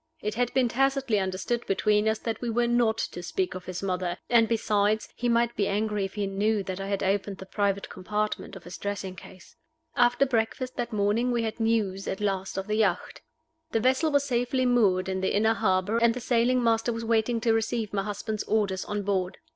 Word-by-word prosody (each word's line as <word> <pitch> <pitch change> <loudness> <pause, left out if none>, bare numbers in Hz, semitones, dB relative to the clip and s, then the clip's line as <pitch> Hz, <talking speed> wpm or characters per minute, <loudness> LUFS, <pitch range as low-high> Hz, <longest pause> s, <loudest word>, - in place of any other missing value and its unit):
It 210 -7 -3
had 245 +1 0
been 260 -2 +4
tacitly 270 -2 +1
understood 190 +5 -2
between 210 +2 +2
us 220 - 0
that 225 -1 -4
we 240 - -2
were 240 +1 +1
not 235 -2 +2
to 175 - -4
speak 365 - -2
of 185 -1 -8
his 185 +1 -5
mother 180 -2 -1
and, 230 -2 +5
besides, 215 -1 +1
he 245 - -1
might 235 0 +2
be 200 - +1
angry 210 0 0
if 195 - -8
he 205 -1 -1
knew 200 +2 0
that 185 0 -5
I 195 - -4
had 200 -1 -1
opened 195 0 0
the 190 - -9
private 200 0 -1
compartment 210 +4 -3
of 190 - -10
his 175 - -9
dressing 200 -2 -4
case. 185 0 -14 0.4
After 245 +2 +4
breakfast 255 +1 -1
that 240 - -2
morning 215 +3 +1
we 235 -1 0
had 220 +1 -4
news 215 -4 0
at 190 - -3
last 195 -2 -2
of 195 - -2
the 215 +1 -1
yacht. 220 - 0 0.5
The 225 - +3
vessel 260 +7 +2
was 285 -1 +3
safely 255 0 0
moored 200 -7 +3
in 190 0 -2
the 190 - 0
inner 220 +2 +3
harbor, 205 0 +1
and 235 0 +3
the - - -3
sailing 245 +1 +2
master 225 0 +2
was 230 0 -4
waiting 230 +1 +1
to 225 0 +3
receive 225 -1 -1
my 200 - +1
husband's 210 +1 -4
orders 200 -4 0
on 205 -1 -3
board. 190 -2 -1
215 Hz, 215 wpm, -27 LUFS, 195-235 Hz, 0.5 s, and